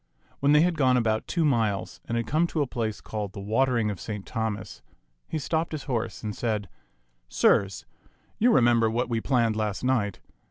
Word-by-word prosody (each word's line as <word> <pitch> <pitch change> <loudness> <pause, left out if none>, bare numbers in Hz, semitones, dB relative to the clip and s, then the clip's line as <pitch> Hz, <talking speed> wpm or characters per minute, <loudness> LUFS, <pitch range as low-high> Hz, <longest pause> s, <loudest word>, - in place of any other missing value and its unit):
When 140 +1 +3
they 150 +1 +6
had 175 0 +2
gone 130 -2 +4
about 110 -2 0
two 170 -3 +1
miles 110 -8 0
and 115 - -2
had 115 - -1
come 160 +7 +2
to 155 -3 0
a - - -2
place 115 -4 -3
called 105 -3 -5
the - - -7
Watering 115 +2 +1
of 100 - -7
Saint 105 -3 -6
Thomas, 110 -3 -4 0.5
he 160 - -3
stopped 160 +2 -1
his 150 - -4
horse 120 -5 -3
and 105 -1 -4
said, 105 -5 -2 0.6
"Sirs, 100 +8 +2 0.5
you 240 +3 +5
remember 120 - +4
what 120 +3 -1
we 115 -1 0
planned 115 -4 +2
last 105 -1 -2
night. 120 -7 0
115 Hz, 190 wpm, -26 LUFS, 105-135 Hz, 0.6 s, they